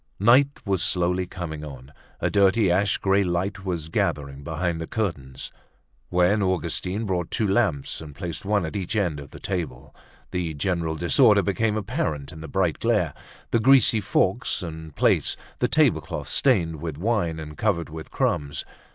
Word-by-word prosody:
Night 125 +7 +6 0.2
was 95 -2 0
slowly 90 -1 +1
coming 80 -4 -6
on; 70 -2 -10 0.3
a - - 0
dirty 100 0 +4
ashy 100 +3 +2
grey 100 +1 +3
light 95 +3 -2
was 85 -4 -3
gathering 75 -7 -2
behind 80 +2 -2
the 80 - -4
curtains. 75 - -4 0.6
When 90 +4 +3
Augustine 95 +2 -1
brought 90 -4 -1
two 110 - 0
lamps 95 - 0
and 75 -3 -10
placed 85 +3 -5
one 100 -2 +1
at 80 - -6
each 95 +1 -3
end 90 -8 0
of 70 -1 -10
the - - -11
table, 70 -9 -4 0.4
the 85 -3 -2
general 80 +1 -1
disorder 80 - +4
became 110 -1 0
apparent 100 - -2
in 80 - -10
the 80 - -7
bright 90 -3 0
glare—the 115 - -1
greasy 120 -2 +5
forks 95 - 0
and 80 -3 -7
plates, - - +2 0.2
the - - +2
table - - +3
cloth - - -6
stained 85 - +2
with 80 -1 -5
wine 90 -4 0
and 75 -1 -8
covered 90 -3 0
with 80 0 -8
crumbs. 70 -1 -1
90 Hz, 165 wpm, -25 LUFS, 80-100 Hz, 0.6 s, Night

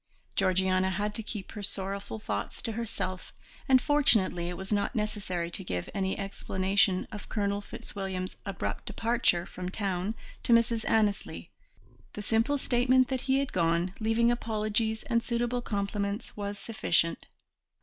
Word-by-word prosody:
Georgiana 185 0 +3
had 205 +2 -1
to 225 - -1
keep 210 -3 -6
her 210 - -6
sorrowful 195 - -3
thoughts 105 -1 -3
to 230 - 0
herself, 205 -5 -4 0.4
and 260 -1 +8
fortunately 225 - +3
it 180 - -5
was 190 +2 -3
not 205 -1 0
necessary 195 -5 -2
to 190 - -3
give 90 - -3
any 190 -1 -1
explanation 195 -1 +1
of 205 -1 -8
Colonel 200 -1 0
Fitzwilliam's 190 -2 -5
abrupt 195 -3 -4
departure 225 -7 +2
from 180 0 -6
town 195 +1 -1 0.3
to 235 - +3
Mrs. 230 -1 +3
Annesley; 215 -3 +1 0.6
the 210 - -5
simple 230 +7 +2
statement 255 0 +3
that 260 -2 -1
he 265 0 +2
had 275 -1 -1
gone, 170 +1 +2
leaving 225 +2 +3
apologies 220 -1 0
and 235 -2 +1
suitable 240 0 0
compliments, 200 0 -2
was 205 0 -4
sufficient. 185 -6 +1
205 Hz, 145 wpm, -30 LUFS, 190-230 Hz, 0.6 s, and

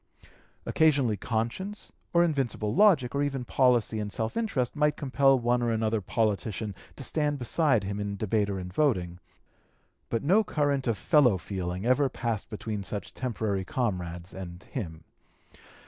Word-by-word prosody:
Occasionally 140 -8 +3
conscience, 120 - -3 0.2
or 170 0 +5
invincible 135 -9 -1
logic, 175 -11 +4
or 140 - 0
even 135 -3 -1
policy 120 -4 +2
and 105 -1 -3
self 110 +1 -3
interest, 160 - -1
might 150 0 +2
compel 135 -1 +3
one 120 0 +1
or 120 -1 +1
another 110 -1 0
politician 105 0 -1 0.2
to 135 - -5
stand 150 +1 0
beside 130 -2 +2
him 100 +1 -3
in 100 -1 -3
debate 105 0 0
or 95 -1 -2
in 90 0 -7
voting; 90 - 0 0.9
but 115 - -1
no 195 +9 +4
current 145 -7 0
of 115 -3 +1
fellow 125 -4 +4
feeling 90 +1 -4
ever 130 +3 +3
passed 115 -5 -3
between 105 -2 -4
such 100 +1 -5
temporary 110 -6 -2
comrades 90 -6 -3
and 90 -1 -8
him. 80 -10 -5
115 Hz, 150 wpm, -28 LUFS, 100-140 Hz, 0.9 s, or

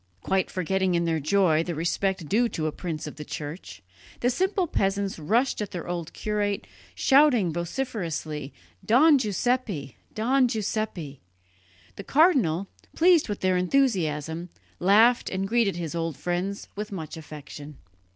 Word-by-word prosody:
Quite 190 -1 +1
forgetting 185 0 0
in 170 0 +1
their 165 -1 0
joy 160 0 +3
the 170 0 -4
respect 175 +2 -1
due 235 +7 +2
to 155 - -3
a 155 - 0
prince 160 -1 -5
of 150 - -8
the 150 - -6
Church, 145 - -7 0.4
the 245 - +2
simple 375 +7 +1
peasants 195 - -1
rushed 225 - +1
at 210 - -3
their 175 - -6
old 170 -2 -4
curate, 205 - -2 0.3
shouting 245 - +4
vociferously, 170 - -4 0.3
"Don 285 +5 +5
Giuseppe! 210 - -1 0.2
Don 255 +4 +3
Giuseppe!" 205 - -3 0.8
The 200 - -6
cardinal, 240 - +3 0.3
pleased 340 -5 +4
with 205 - -4
their 185 -1 +2
enthusiasm, 175 - 0 0.3
laughed 220 +6 +4
and 195 +1 -2
greeted 225 -3 +2
his 170 -3 -4
old 165 -3 -3
friends 180 +3 -3
with 210 +1 -5
much 165 -6 -6
affection. 150 -2 -10
190 Hz, 140 wpm, -26 LUFS, 160-225 Hz, 0.8 s, Don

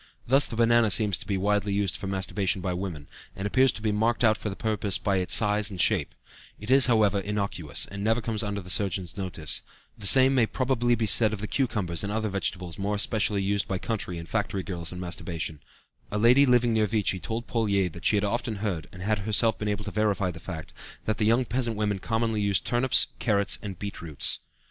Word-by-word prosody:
Thus 135 +3 +4
the - - -6
banana 115 -1 +4
seems 105 -2 +3
to - - -8
be 100 - 0
widely 100 +1 0
used 100 -2 0
for 95 - -6
masturbation 95 +1 -1
by 90 0 -2
women, 90 -6 -5 0.3
and 95 - -5
appears 130 +5 +4
to 110 - -9
be 110 - +1
marked 115 +4 0
out 110 -2 +5
for 110 - -5
the 95 - -6
purpose 105 -3 0
by 100 -2 0
its 90 -1 +2
size 105 -1 +3
and 95 -3 -8
shape; 90 -7 +2 0.4
it 105 +4 -4
is, 135 -1 +6
however, 105 -4 +3
innocuous, 100 -6 -2
and 100 0 -7
never 115 +2 +2
comes 110 -2 -2
under 105 -2 -3
the 90 0 -6
surgeon's 90 -2 0
notice; 90 -5 -3 0.3
the 105 -4 -2
same 130 +4 +7
may 120 -4 +3
probably 120 -2 +1
be 115 -1 -1
said 110 0 +3
of 105 - -4
the 105 - -4
cucumbers 105 -11 -1
and 100 - -3
other 110 0 -1
vegetables 95 -2 -2
more 100 +1 -1
especially 105 -1 0
used 100 +1 0
by 95 - -2
country 95 -4 -3
and 85 0 -8
factory 100 -3 -2
girls 85 -3 -4
in 90 - -7
masturbation; 85 -3 -4 0.5
a 105 - -3
lady 125 +6 +5
living 120 -2 +3
near 110 -1 +2
Vichy 105 -3 0
told 115 +4 -4
Pouillet 100 -5 0
that 85 - -11
she - - +4
had 100 - +1
often 115 +2 -1
heard 100 -7 -3
(and 90 0 -9
had 105 +1 0
herself 110 +2 +1
been 105 - -3
able 105 0 -2
to 100 - -5
verify 100 -3 0
the 80 - -10
fact) 80 -2 -8 0.3
that 110 0 -1
the 105 - +2
young 115 +4 +3
peasant 120 0 -2
women 105 -2 -1
commonly 110 +1 -1
used 100 -1 0
turnips, 120 0 +3
carrots, 105 -4 +1
and 100 -4 -6
beet 100 +2 -6
roots. 75 -5 -2
105 Hz, 225 wpm, -26 LUFS, 95-115 Hz, 0.5 s, same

